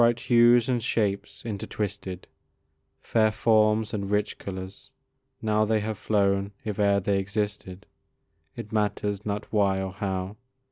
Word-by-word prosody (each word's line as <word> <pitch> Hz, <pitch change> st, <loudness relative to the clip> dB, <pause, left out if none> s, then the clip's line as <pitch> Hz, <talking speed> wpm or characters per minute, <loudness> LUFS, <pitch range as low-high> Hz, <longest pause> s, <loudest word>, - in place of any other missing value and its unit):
Bright 120 Hz, 0 st, +3 dB
hues 120 Hz, 0 st, +5 dB
and 125 Hz, -2 st, +1 dB
shapes 100 Hz, -3 st, -1 dB
intertwisted, 100 Hz, -3 st, -4 dB, 0.8 s
Fair 110 Hz, -1 st, +2 dB
forms 110 Hz, 0 st, +2 dB
and 100 Hz, -2 st, -3 dB
rich 105 Hz, 0 st, -1 dB
colours; 95 Hz, 0 st, -7 dB, 0.5 s
now 110 Hz, -1 st, +2 dB
They 110 Hz, 0 st, +2 dB
have 110 Hz, +1 st, -3 dB
flown 100 Hz, -1 st, +1 dB
if 105 Hz, -1 st, -3 dB
e'er 100 Hz, -1 st, +4 dB
they 100 Hz, 0 st, +1 dB
existed 100 Hz, -1 st, -4 dB, 0.7 s
It 105 Hz, -, -8 dB
matters 105 Hz, -1 st, -1 dB
not 105 Hz, +1 st, -4 dB
why 100 Hz, -2 st, +2 dB
or 95 Hz, 0 st, -3 dB
how. 95 Hz, 0 st, -3 dB
105 Hz, 135 wpm, -26 LUFS, 100-110 Hz, 0.8 s, hues